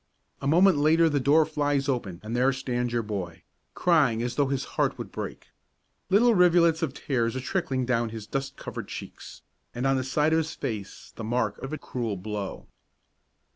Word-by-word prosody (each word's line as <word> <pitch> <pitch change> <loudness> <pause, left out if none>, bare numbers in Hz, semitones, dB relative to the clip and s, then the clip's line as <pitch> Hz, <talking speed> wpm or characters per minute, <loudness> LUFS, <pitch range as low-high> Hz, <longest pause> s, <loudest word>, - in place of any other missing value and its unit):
A 140 - -2
moment 175 +1 +5
later 160 +2 +4
the 145 -2 +1
door 150 +4 +4
flies 145 -2 0
open 110 -10 -2
and 110 +2 -4
there 130 +2 +3
stands 125 -2 -2
your 120 -1 0
boy, 95 -6 -5 0.3
crying 140 -10 +3
as 120 0 -2
though 140 +2 +1
his 135 -1 -1
heart - - +1
would - - -7
break. - - -7 0.6
Little 230 +5 +5
rivulets 175 -3 +4
of 145 -5 -2
tears 120 -3 -1
are - - -1
trickling 130 -2 -1
down 120 -2 +1
his 110 -2 -7
dust 135 +4 -4
covered - - -6
cheeks, - - -9 0.3
and 125 +2 -2
on 135 0 +3
the 130 - -1
side 150 +4 +1
of - - +4
his 160 -1 -2
face 105 -4 -4 0.2
is - - -22
the 115 - -7
mark 115 -2 -1
of 135 - -6
a 155 - -3
cruel 115 -8 -4
blow. 100 +1 -5
130 Hz, 195 wpm, -27 LUFS, 115-155 Hz, 0.6 s, moment